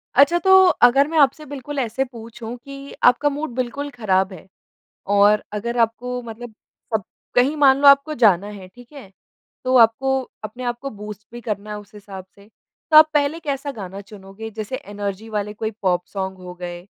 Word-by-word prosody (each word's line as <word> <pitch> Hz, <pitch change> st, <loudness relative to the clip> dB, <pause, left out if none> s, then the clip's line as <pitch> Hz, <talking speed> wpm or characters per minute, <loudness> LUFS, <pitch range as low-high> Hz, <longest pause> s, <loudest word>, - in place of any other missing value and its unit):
अच्छा 285 Hz, +6 st, +5 dB
तो 380 Hz, +1 st, +2 dB, 0.3 s
अगर 270 Hz, +4 st, +6 dB
मैं 325 Hz, -, -2 dB
आपसे 300 Hz, +2 st, +3 dB
बिल्कुल 285 Hz, 0 st, -6 dB
ऐसे 245 Hz, +1 st, -1 dB
पूछूँ 230 Hz, -1 st, -9 dB
कि 275 Hz, +2 st, -11 dB
आपका 250 Hz, +4 st, +4 dB
मूड 290 Hz, -2 st, -5 dB
बिल्कुल 260 Hz, +3 st, -3 dB
ख़राब 195 Hz, -6 st, 0 dB
है 185 Hz, +1 st, -13 dB, 0.7 s
और 205 Hz, +1 st, +5 dB
अगर 235 Hz, +3 st, -3 dB
आपको 240 Hz, +2 st, -1 dB
मतलब 230 Hz, 0 st, -9 dB, 0.4 s
सब 215 Hz, -, +1 dB, 0.3 s
कहीं 265 Hz, +5 st, +3 dB
मान 275 Hz, -2 st, +5 dB
लो 285 Hz, -, +7 dB
आपको 280 Hz, +2 st, +5 dB
जाना 205 Hz, -, +3 dB
है 200 Hz, -3 st, -10 dB
ठीक 245 Hz, +7 st, -18 dB
है। 265 Hz, -10 st, -12 dB, 0.5 s
तो 255 Hz, 0 st, +2 dB
आपको 265 Hz, +4 st, +3 dB, 0.2 s
अपने 245 Hz, +4 st, -7 dB
आप 240 Hz, -1 st, -2 dB
को 275 Hz, -, -4 dB
बूस्ट 210 Hz, -1 st, -10 dB
भी 240 Hz, -, -8 dB
करना 210 Hz, -3 st, -5 dB
है 210 Hz, -, -5 dB
उस 210 Hz, +1 st, -15 dB
हिसाब 195 Hz, -2 st, -10 dB
से। 200 Hz, 0 st, -19 dB, 0.4 s
तो 310 Hz, -, +6 dB
आप 310 Hz, 0 st, +8 dB
पहले 295 Hz, +2 st, +1 dB
कैसा 285 Hz, -2 st, -3 dB
गाना 195 Hz, -4 st, -8 dB
चुनोगे 200 Hz, +2 st, -10 dB
जैसे 220 Hz, +4 st, -5 dB
एनर्जी 205 Hz, 0 st, -6 dB
वाले 210 Hz, 0 st, -3 dB
कोई 220 Hz, +1 st, -3 dB
पॉप 180 Hz, -1 st, +1 dB
सॉन्ग 190 Hz, -1 st, -4 dB
हो 180 Hz, -1 st, -10 dB
गए 175 Hz, +1 st, -7 dB
230 Hz, 185 wpm, -21 LUFS, 205-275 Hz, 0.7 s, आप